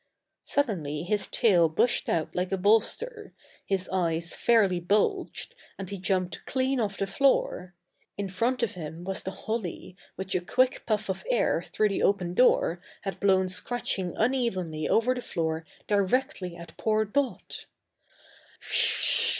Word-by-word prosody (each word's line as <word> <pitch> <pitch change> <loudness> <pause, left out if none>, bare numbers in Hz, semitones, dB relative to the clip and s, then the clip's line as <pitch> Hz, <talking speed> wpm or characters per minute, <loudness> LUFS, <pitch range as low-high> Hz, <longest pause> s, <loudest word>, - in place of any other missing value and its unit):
Suddenly 165 - -1
his 205 +3 -1
tail 175 -8 +4
bushed 240 +10 +1
out 160 - -1
like 180 0 -1
a 195 - +1
bolster, 230 - +1 0.3
his 190 -2 -1
eyes 170 -2 -1
fairly 205 -7 +3
bulged, 200 +5 0 0.2
and 195 -1 -7
he 200 - -5
jumped 185 -1 -1
clean 260 0 0
off 205 -3 -1
the 195 - 0
floor. 195 -4 +1 0.4
In 200 -1 -2
front 235 +7 -1
of 235 - 0
him 160 -1 -7
was 195 +1 -2
the - - -4
holly 190 -3 -5 0.2
which 190 0 -4
a 180 - +1
quick 255 +8 +1
puff 215 -1 0
of 190 - -3
air - - +2
through 215 -1 0
the 195 - -2
open 180 -3 +1
door 180 -6 +3 0.2
had 195 -3 -4
blown 190 -2 +3
scratching 185 -1 -2
unevenly 190 -11 0
over 235 +3 +3
the 250 - -5
floor 160 -5 -3 0.2
directly 200 -3 0
at 170 -2 -11
poor 215 0 +1
Dot. 260 +5 -3
195 Hz, 145 wpm, -27 LUFS, 180-230 Hz, 0.4 s, tail